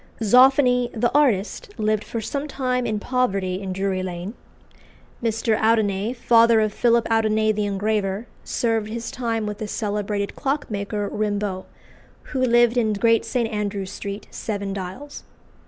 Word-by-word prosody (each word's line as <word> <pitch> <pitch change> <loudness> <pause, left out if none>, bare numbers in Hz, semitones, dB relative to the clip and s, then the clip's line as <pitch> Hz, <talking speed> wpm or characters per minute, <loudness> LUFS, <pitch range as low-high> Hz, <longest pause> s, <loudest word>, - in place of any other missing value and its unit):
Zoffany, 250 +1 +5
the 240 +1 +1
artist, 270 - +1
lived 215 0 0
for 230 - -5
some 280 +6 -3
time 255 -3 -1
in 215 -1 -1
poverty 195 -7 -1
in 190 -1 -4
Drury 190 0 -1
Lane. 180 +2 -5 0.9
Mr. 225 -1 +1
Audinet, 220 0 +1
father 230 -1 +5
of 215 -1 +1
Philip 235 0 +2
Audinet 220 -1 +2
the 210 0 0
engraver, 200 +1 -1 0.2
served 225 -2 -1
his 230 +1 -5
time 230 -3 -2
with 210 0 -5
the 215 - -4
celebrated 205 -1 -2
clockmaker, 210 -8 -2
Rimbault, 205 -2 -2 0.7
who 260 - 0
lived 240 -1 +4
in 220 -3 +2
Great 230 +2 +2
St. 240 -3 0
Andrew's 200 -2 -3
Street, 200 +1 -6
Seven 200 -3 -4
Dials. 195 +10 -7
215 Hz, 140 wpm, -23 LUFS, 200-240 Hz, 0.9 s, Zoffany